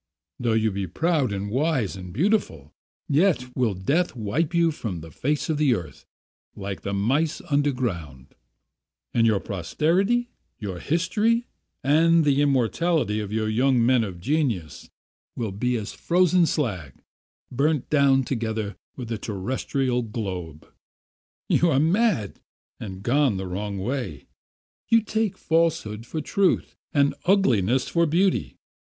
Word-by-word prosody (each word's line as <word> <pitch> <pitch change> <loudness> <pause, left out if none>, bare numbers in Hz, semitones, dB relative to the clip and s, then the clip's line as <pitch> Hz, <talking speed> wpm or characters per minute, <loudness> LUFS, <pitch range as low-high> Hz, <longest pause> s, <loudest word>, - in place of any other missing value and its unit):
Though 120 -2 +1
you 110 -1 +2
be 95 -1 -3
proud 155 - 0
and 100 0 -3
wise 135 - 0
and 90 -1 -8
beautiful, 115 - 0 0.3
yet 145 -5 +1
will 120 -6 +1
death 140 - 0
wipe 125 +8 -1
you 170 -1 +3
from 100 - -5
the 80 0 -11
face 145 - -1
of 155 -2 -1
the 140 -5 +4
earth 85 -7 -8 0.5
like 95 -4 -5
the 100 - -4
mice 135 +11 0
underground; 115 - -1 0.8
and 115 -1 +3
your 105 -3 +3
posterity, 180 - 0 0.3
your 95 -5 -5
history, 210 - +1 0.4
and 160 +4 +4
the 145 -1 +3
immortality 140 -2 +1
of 105 -1 -5
your 110 +5 +1
men 120 0 +3
of 95 -5 -6
genius 115 - -2 0.5
will 115 -4 -3
be 125 +6 -1
as 110 -3 -4
frozen 180 0 +3
slag, 95 - -2 0.6
burnt 140 +1 +1
down 140 -2 +4
together 110 -4 -3 0.2
with 125 -3 -6
the 115 -2 -4
terrestrial 125 +5 -2
globe. 95 -9 -5 0.8
"You 175 - +3
are 135 - +3
mad, 165 - +1 0.4
and 95 -2 -7
gone 130 -2 +2
the 95 - -4
wrong 100 +2 -4
way. 100 - -4 0.6
You 230 -1 +5
take 220 -2 -1
falsehood 150 -10 0
for 155 - -3
truth 195 +5 +1 0.2
and 140 -3 +3
ugliness 130 - +3
for 170 -1 +2
beauty. 170 - +1
125 Hz, 135 wpm, -24 LUFS, 100-160 Hz, 0.8 s, You